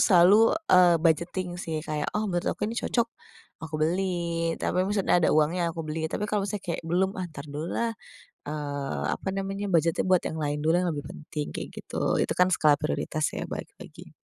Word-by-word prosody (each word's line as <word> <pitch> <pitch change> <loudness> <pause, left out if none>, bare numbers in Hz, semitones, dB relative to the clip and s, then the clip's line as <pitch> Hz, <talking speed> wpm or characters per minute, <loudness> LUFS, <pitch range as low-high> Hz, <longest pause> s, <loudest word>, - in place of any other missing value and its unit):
selalu, 205 - +6 0.2
eee, 180 -2 +7
budgeting 175 +2 0
sih 160 -2 -4
kayak, 150 -1 -2
oh, 215 - 0
menurut 175 -4 -1
aku - - -2
nih 230 +2 -2
cocok, 235 - +1 0.6
aku 160 -1 -8
beli, 170 0 0
tapi 180 - 0
maksudnya 200 -3 +2
ada - - +3
uangnya 165 +3 +2
aku 165 -2 -4
beli. 160 +1 -3
Tapi 205 - -2
kalau 205 -1 -1
misalnya 205 0 -4
kayak, 170 - -3
"Belum 190 +3 +2
ah, - - -2
entar 140 -3 -9
dulu 150 +2 -5
lah, 235 -1 0 0.5
eee, 145 -2 -4
apa - - -9
namanya, 195 +1 -3
budget-nya 165 -1 +2
buat 185 -1 +4
yang - - -5
lain 145 0 -1
dulu 160 +3 +2
yang 180 0 +2
lebih 145 -2 -5
penting," 150 -1 -6
kayak - - -5
gitu. - - -2
Itu - - +1
kan 180 +1 +4
skala 150 -5 +5
prioritas 150 +1 -2
ya, - - -5
balik - - -6
lagi. - - -12
170 Hz, 200 wpm, -27 LUFS, 155-190 Hz, 0.6 s, eee